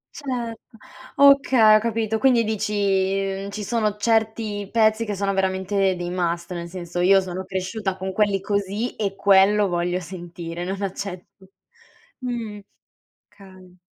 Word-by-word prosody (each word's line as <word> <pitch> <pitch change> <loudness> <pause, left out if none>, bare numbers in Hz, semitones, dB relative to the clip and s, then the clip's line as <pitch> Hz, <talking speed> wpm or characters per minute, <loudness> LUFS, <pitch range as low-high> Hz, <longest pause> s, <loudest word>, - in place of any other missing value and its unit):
Certo, 235 -5 -6 0.4
okay, 265 -6 +6
ho 215 - +5
capito. 220 -1 -1
Quindi 245 -3 +3
dici, 195 -2 -1
ci 210 +1 -5
sono 215 -1 0
certi 220 -2 0
pezzi 220 0 +3
che 210 -2 -3
sono 195 0 -1
veramente 190 0 0
dei 175 0 -4
must, 175 -1 -2
nel 170 0 -6
senso, 175 -1 -5
io 195 +2 +6
sono 185 0 -5
cresciuta 190 +1 -3
con 190 0 -4
quelli 205 -1 +2
così 205 +3 -2
e 200 -2 -2
quello 200 +1 +4
voglio 175 0 -1
sentire, 175 -1 -7
non 195 +2 -4
accetto 190 -1 -7 0.7
mhmm, 235 -5 -5 0.7
okay. 185 -2 -17
195 Hz, 135 wpm, -23 LUFS, 185-220 Hz, 0.7 s, okay